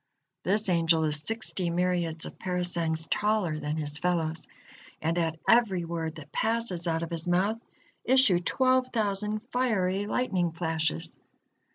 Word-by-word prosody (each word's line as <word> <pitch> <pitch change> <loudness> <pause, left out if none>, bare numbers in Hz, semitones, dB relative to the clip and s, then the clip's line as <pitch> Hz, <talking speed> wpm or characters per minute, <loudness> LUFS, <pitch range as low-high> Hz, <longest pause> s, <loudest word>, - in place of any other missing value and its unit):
This 205 +3 +1
angel 165 -2 +3
is 150 -1 0
sixty 195 -2 -2
myriads 170 -2 0
of - - -10
parasangs 175 -3 -1
taller 205 -7 +1
than 150 +1 -3
his 150 -1 -1
fellows, 165 -2 -1 0.5
and 165 +2 0
at 165 -2 0
every 205 -7 +4
word 165 -1 -3
that 150 -2 -11
passes 220 -6 +1
out 165 0 0
of 170 - -5
his 165 0 -4
mouth, 195 +6 +1 0.4
issue 255 -8 +4
twelve 255 +7 +2
thousand 210 -2 -1
fiery 205 -6 +1
lightning 185 -9 0
flashes. 160 -2 -1
175 Hz, 140 wpm, -28 LUFS, 160-210 Hz, 0.5 s, every